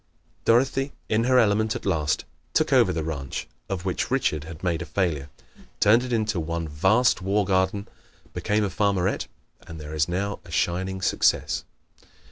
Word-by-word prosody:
Dorothy, 135 +4 +2 0.2
in 110 +2 +2
her 130 0 +4
element 110 -1 +3
at - - -6
last, 75 -3 0 0.3
took - - +2
over 95 - +5
the 80 -3 -2
ranch 70 -4 -4 0.2
(of 95 -2 -3
which 95 - -1
Richard 100 - 0
had 80 +1 -10
made 85 -3 0
a - - -4
failure), 80 -7 -1 0.5
turned 110 +3 +5
it 125 0 -5
into 110 -4 0
one 85 0 -3
vast 95 +11 +3
war 100 +2 +1
garden, 95 +1 +1 0.5
became 105 +1 0
a 100 - -1
farmerette 95 -1 0 0.4
and 80 -1 -8
is 75 0 -1
there 90 +1 -1
now 100 0 -3
a 90 - -15
shining 95 +3 -1
success. - - +1
95 Hz, 165 wpm, -25 LUFS, 80-110 Hz, 0.5 s, over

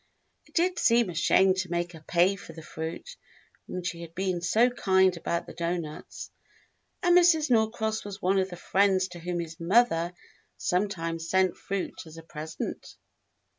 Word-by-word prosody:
It - - -25
did 360 +2 +2
seem 230 -4 +3
a - - -8
shame 185 +3 +4
to 185 -1 -3
make 175 0 -1
her 160 -2 -12
pay 180 +3 +3
for 180 -4 -11
the 160 0 -10
fruit 160 - -6 0.6
when 185 - -5
she 170 -1 -4
had 165 0 -10
been 185 -1 -1
so 225 +8 +3
kind 190 -5 +3
about 170 0 -2
the - - -10
doughnuts, 170 -3 -5 0.7
and 350 -1 +5
Mrs. 325 -5 +5
Norcross 220 -1 +1
was 205 0 -7
one 195 0 +2
of 190 0 0
the 175 - -7
friends 190 0 +2
to 175 -1 -10
whom 175 +1 -3
his 165 -1 -6
mother 175 -2 +2 0.4
sometimes 165 -4 -2
sent 190 -1 +2
fruit 195 -1 -4
as 160 +1 -12
a 165 - -10
present. 160 0 -6
185 Hz, 170 wpm, -28 LUFS, 170-205 Hz, 0.7 s, and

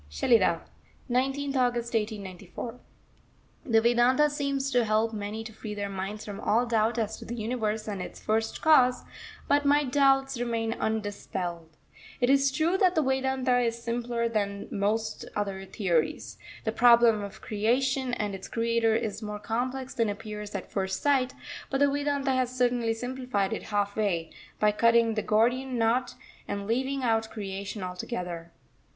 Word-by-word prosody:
SHELIDAH, 185 - +3 0.5
19th 270 +3 0
August 240 -2 0
1894. 215 +2 -4 0.9
The 225 -2 +4
Vedanta 245 +5 +4
seems 280 -2 -1
to 245 -2 +3
help 220 +1 +1
many 210 +1 -4
to 220 0 -9
free 210 -1 -7
their 200 -1 -3
minds 195 +2 -5
from 205 -1 -6
all 235 +3 +2
doubt 225 0 +1
as 220 -1 -1
to - - -10
the 235 - -5
Universe 220 -1 -2
and 200 -3 -3
its - - -7
First 220 +1 -1
Cause, 255 -6 +5 0.4
but 285 0 +3
my 290 +1 +4
doubts 270 -1 +2
remain 230 -2 -1
undispelled. 190 -7 -4 0.4
It 245 +1 +3
is 275 0 +4
true 330 +7 +1
that 370 -1 +4
the 315 - +3
Vedanta 265 -1 +1
is 235 -1 0
simpler 235 0 -1
than 200 -3 -2
most 215 +3 -1
other 195 -2 -3
theories. 175 -6 -1 0.2
The 220 - 0
problem 235 -2 +5
of 200 0 -8
Creation 250 +4 0
and 210 -4 -2
its 190 -1 -7
Creator 230 -1 +1
is 220 -2 -2
more 210 -1 -4
complex 250 +5 -3
than 230 -2 +1
appears 210 0 -6
at 195 - -5
first 190 -1 -2
sight; 270 -3 +2 0.3
but 270 - 0
the 285 - +5
Vedanta 285 -1 0
has 255 -1 +1
certainly 240 -2 +1
simplified 245 -5 -2
it - - -3
half 205 -1 -1
way, 180 -7 -1 0.3
by 210 0 +4
cutting 230 +1 +4
the 215 - -1
Gordian 245 +5 +1
knot 235 +2 +1 0.3
and 200 0 -3
leaving 260 +5 -1
out 225 -2 +1
Creation 200 -1 -5
altogether. 180 -2 -5
230 Hz, 160 wpm, -28 LUFS, 210-255 Hz, 0.9 s, Cause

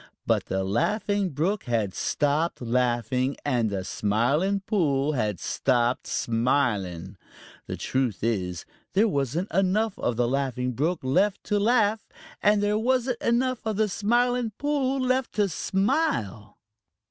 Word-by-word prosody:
But - - +1
the 95 0 -1
Laughing 200 - 0
Brook 175 +8 -1
had 110 -6 -1
stopped 150 - 0
laughing, 125 +2 0
and 120 -6 +1
the 95 -2 -3
Smiling 140 - 0
Pool 155 -9 +1
had 105 - -1
stopped 120 +3 0
smiling. 105 -7 -1 0.5
The - - -4
truth 125 -8 -1
is 90 -7 -1 0.3
there 205 +4 +4
wasn't 150 - -1
enough 195 +3 +1
of 120 - -1
the 120 +1 +1
Laughing 125 -1 -1
Brook 155 +8 -1
left 185 +10 +1
to 210 - 0
laugh, 220 0 +2 0.3
and 205 0 +3
there 210 +1 +1
wasn't 250 +1 0
enough 250 +1 +1
of 220 -2 -2
the 215 +1 +2
Smiling 240 +3 +1
Pool 275 -2 0
left 255 0 0
to 205 -2 +2
smile. 190 - -1
150 Hz, 135 wpm, -26 LUFS, -, 0.5 s, there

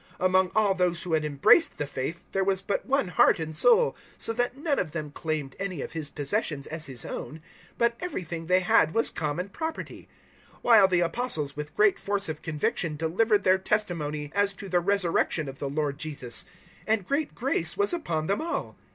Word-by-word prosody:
004:032 - - 0
Among 185 0 +3
all 210 -2 +4
those 180 -2 0
who 175 - -3
had 155 -1 +2
embraced 150 - +4
the 145 - -2
faith 145 +5 -5
there 195 - +1
was 190 0 0
but 200 - -2
one 270 -7 +1
heart 180 - +4
and 160 -1 -5
soul, 475 - +5 0.2
so 225 - -1
that 245 +2 -1
none 290 0 0
of 160 -4 -3
them 150 -3 -4
claimed 155 -3 -3
any 190 -7 -3
of - - -7
his 155 -3 -5
possessions 145 -1 -2
as 160 0 -4
his 130 -3 -6
own, 155 - -6 0.4
but 235 0 +2
everything 170 - -5
they 185 +1 +4
had 160 -3 +3
was 225 - +2
common 160 +5 -3
property; 320 +9 -6 0.4
004:033 - - -23
while 220 -5 +7
the 180 -2 +2
Apostles 165 - -1
with 150 0 -7
great 405 -2 +4
force 200 0 -1
of 155 -1 -5
conviction 155 0 -1
delivered 200 +7 +1
their 185 0 +4
testimony 155 -8 -1
as 200 0 +2
to 195 +1 -9
the 180 -1 +2
resurrection 175 -4 +1
of 135 0 -8
the 140 - -3
Lord 145 0 -2
Jesus; 140 -7 -4 0.4
and 215 -4 +1
great 290 +1 -1
grace - - -1
was 405 -2 +2
upon 165 - -2
them 200 +4 0
all. 335 +1 -3
180 Hz, 200 wpm, -27 LUFS, 155-210 Hz, 0.4 s, while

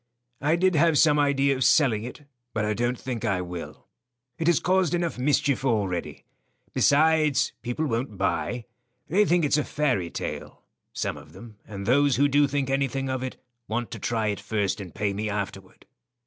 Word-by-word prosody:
"I 150 +4 +2
did 185 +2 +2
have 160 0 +4
some 150 -1 +5
idea 140 -1 +2
of 130 - 0
selling 125 -9 +3
it, 125 +4 -8 0.3
but 110 -1 0
I 105 - 0
don't 120 +4 -1
think 125 -4 -5
I 95 -2 +1
will. 90 -1 -7 0.5
It 165 - -1
has 175 -3 +4
caused 185 -2 +2
enough 170 -6 -2
mischief 140 0 +1
already. 100 -9 -1 0.5
Besides, 155 0 +3
people 120 +6 -2
won't 115 -4 -2
buy. 100 +5 -1 0.4
They 200 +6 +4
think 175 -3 +2
it's 145 +1 +2
a - - 0
fairy 130 - -1
tale; - - -6 0.3
some - - -3
of - - -14
them, 115 -3 -12
and 100 -2 -7
those 140 +3 +3
who 140 +3 +4
do 145 +1 +3
think 140 -1 -1
anything 135 0 -1
of 130 -1 -2
it 130 0 -5 0.3
want 120 +2 -3
to - - -6
try 110 -2 -1
it 100 - -2
first 105 -1 -2
and 90 -3 -10
pay 100 -1 -1
me 105 +2 -3
afterward." 95 -2 -6
130 Hz, 185 wpm, -26 LUFS, 105-145 Hz, 0.5 s, some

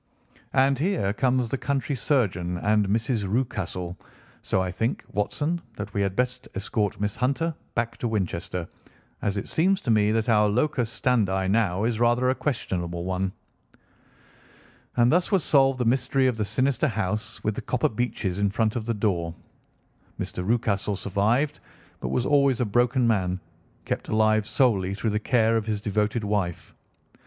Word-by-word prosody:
And 135 0 +3
here 160 - +1
comes 125 +1 +1
the 135 - -2
country 140 +1 -1
surgeon 95 - 0
and 105 +2 +2
Mrs. 110 0 0
Rucastle, 90 -7 -2 0.5
so - - 0
I 95 -1 -1
think, 115 +6 -2
Watson, 150 - -1
that 105 - -6
we 100 - 0
had 100 -1 0
best 125 +2 -1
escort 100 +1 -1
Miss 105 0 -1
Hunter 140 +7 0 0.2
back 115 0 -1
to 120 - -2
Winchester, 90 -4 -2 0.5
as 100 0 -1
it 100 - -3
seems 185 +4 +2
to 120 - 0
me 105 -1 +3
that 110 +1 0
our 105 -2 +4
locus 125 +1 +1
standi 100 -7 +1
now 100 -2 +1
is 115 -1 0
rather 120 +2 +3
a - - +2
questionable 85 - -3
one." 95 +1 -1 1.7
And 120 +1 +5
thus 175 +4 +2
was 195 -4 +3
solved 135 -2 +4
the 125 - -1
mystery 130 +2 +2
of 130 -2 +2
the 105 - 0
sinister 130 +6 +1
house 110 0 -3
with 105 - 0
the - - -5
copper 125 - 0
beeches 105 -5 -2
in 100 0 +2
front 110 +2 0
of 115 -2 -3
the 115 - 0
door. 85 -6 -1 0.8
Mr. 90 - -3
Rucastle 105 -1 0
survived, 105 +9 0 0.4
but - - -4
was 125 - 0
always 140 -4 +3
a 125 - +2
broken 120 +4 +2
man, 95 -5 +1 0.5
kept - - -3
alive 110 -1 +2
solely 100 -9 +2
through 110 +1 -1
the 105 - 0
care 115 0 +2
of 110 0 -3
his 105 -2 -1
devoted 105 +2 -1
wife. 100 -4 -2
110 Hz, 165 wpm, -25 LUFS, 100-125 Hz, 1.7 s, And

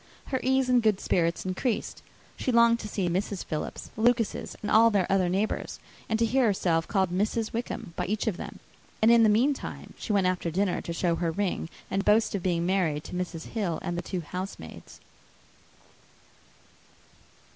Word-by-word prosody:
Her 260 - 0
ease 265 0 +2
and 250 -1 +4
good 215 -3 +2
spirits 170 -1 0
increased. 200 +6 -2 0.3
She 255 - -1
longed 235 0 +5
to 210 - -6
see 195 -3 -1
Mrs. 190 +2 -2
Philips, 155 -2 -5
the 220 - -6
Lucases, 235 -1 +1
and 210 - -2
all 230 +1 +7
their 200 -4 +2
other 190 -2 +3
neighbours, 195 +4 -1 0.3
and 220 - +1
to 230 - +2
hear 255 +3 +2
herself 170 -5 +1
called 190 -3 +1
"Mrs. 215 +4 -1
Wickham" 230 -7 -4
by 180 - -2
each 210 +2 -1
of 220 -5 0
them; - - -7 0.4
and 220 +2 +5
in 235 -1 +7
the 220 - +6
meantime 255 +7 0
she - - -4
went 200 -2 +3
after 185 -2 0
dinner 185 +3 0
to - - -6
show 170 0 0
her 170 -1 0
ring 185 -1 -2 0.2
and 195 +1 0
boast 215 +2 +3
of 200 - -1
being 170 -2 0
married 175 -5 +1
to - - -10
Mrs. 180 -2 -4
Hill 195 -8 -1
and 175 - -2
the 175 - -2
two 180 +1 -4
housemaids. 180 - -8
195 Hz, 185 wpm, -27 LUFS, 175-225 Hz, 0.4 s, all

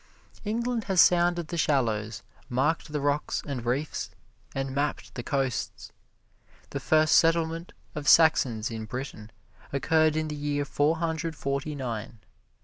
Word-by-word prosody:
England 230 +1 -1
has 190 -3 +1
sounded 175 -2 +4
the 170 - -3
shallows, 110 -8 0 0.3
marked 150 +5 0
the 150 - -1
rocks 145 +1 0
and 125 -5 -4
reefs, 140 +5 -1 0.5
and 135 -1 -2
mapped 145 +2 -2
the 120 - -5
coasts. 135 0 -2 0.8
The 140 - -3
first 155 +3 +3
settlement 165 +1 +2 0.2
of 150 -2 -5
Saxons 125 -9 +4
in 110 -1 -5
Britain 115 -2 -6 0.4
occurred 155 +2 +2
in 155 0 0
the 150 - -4
year 145 0 -1
Four 145 +3 +1
Hundred 160 -1 -2
Forty 140 +2 -3
nine. 115 -4 -5
145 Hz, 140 wpm, -27 LUFS, 130-160 Hz, 0.8 s, sounded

